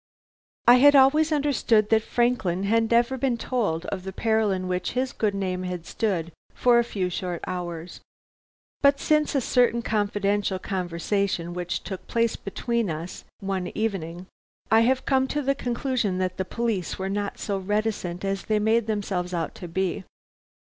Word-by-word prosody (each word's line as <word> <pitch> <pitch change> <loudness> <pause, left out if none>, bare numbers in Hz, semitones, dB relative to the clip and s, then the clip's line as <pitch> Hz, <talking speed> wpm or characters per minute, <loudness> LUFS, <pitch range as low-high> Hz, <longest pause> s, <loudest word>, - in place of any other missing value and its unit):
I 245 +1 +9
had 285 +3 +7
always 300 +4 +5
understood 255 -8 +2
that 220 0 +5
Franklin 220 -7 0
had 225 +2 +2
never 240 +2 +2
been 255 -2 +1
told 210 -10 -1
of 190 - -4
the 190 +1 -6
peril 220 +1 +1
in 185 -1 -1
which 180 0 -2
his 255 +1 -1
good 210 -2 0
name 185 -2 -2
had 180 -2 -5
stood 175 -6 -2 0.2
for 245 -1 +4
a - - +3
few 195 -5 -2
short 175 -1 -4
hours. 175 -1 -5 0.8
But 280 0 +4
since 305 -1 +2
a 275 - +3
certain 240 -1 +2
confidential 205 -2 0
conversation 180 -1 -2
which 180 0 -3
took 190 -3 -7
place 230 -1 +1
between 230 +1 -2
us 160 +3 -6 0.2
one 190 -2 -2
evening, 185 -5 -3 0.5
I 220 - +7
have 255 +3 +2
come 265 -1 +2
to 295 +2 -1
the 275 +1 +2
conclusion 245 -6 -1
that 185 -1 -2
the 190 - -1
police 215 -3 -2
were 190 - -3
not 200 +1 -3
so 200 -2 -2
reticent 200 -2 -2
as 195 0 -2
they 215 - +1
made 220 +1 +2
themselves 190 -4 -2
out 165 -1 -2
to 175 - -8
be. 190 +2 -2
205 Hz, 170 wpm, -25 LUFS, 185-235 Hz, 0.8 s, I